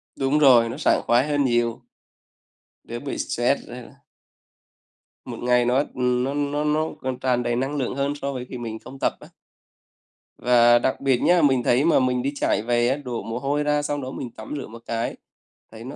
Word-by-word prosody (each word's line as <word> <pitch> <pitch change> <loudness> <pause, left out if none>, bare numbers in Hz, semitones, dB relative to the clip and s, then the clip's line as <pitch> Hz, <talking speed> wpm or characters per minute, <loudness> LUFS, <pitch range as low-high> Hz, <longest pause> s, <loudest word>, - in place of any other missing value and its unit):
Đúng 140 +2 +1
rồi, 120 -5 +6
nó 125 - -6
sảng 155 - +2
khoái 120 +5 +2
hơn 145 -1 +1
nhiều. 120 -1 0 1.0
Đỡ 120 +1 -6
bị 140 - -5
stress 120 +4 -1
nữa. 125 +3 -10 1.3
Một - - -7
ngày 125 0 +2
nó, 125 +1 +1 0.2
ừm, 125 0 +1
nó 135 +2 -2
nó 145 +1 -1
nó 155 +1 +1
còn 130 -1 -3
tràn 125 -2 0
đầy 120 - -1
năng 135 +4 -2
lượng 130 -1 -2
hơn 140 +1 -1
so 140 -1 -4
với 125 -1 -5
khi 125 - -6
mình 110 -2 -6
không 135 +1 -12
tập - - +1
á. - - -13 1.1
Và 120 -1 +5
đặc 130 - -1
biệt 135 -2 +2
nhá, 175 -1 +4
mình 135 -4 +3
thấy 130 +5 +2
mà 165 - +4
mình 125 -1 +1
đi 140 - -1
chạy 125 - 0
về 120 +1 +1
á, 135 - 0
đổ 125 -5 -5
mồ 115 +2 -4
hôi 145 +2 -1
ra 150 0 +1
xong 145 -1 -3
đó 130 0 -6
mình 125 - -6
tắm 110 - -9
rửa - - -6
một 115 +1 -12
cái, 115 +1 -3 0.6
thấy 115 0 -11
nó 135 +4 -8
130 Hz, 210 wpm, -23 LUFS, 120-140 Hz, 1.3 s, rồi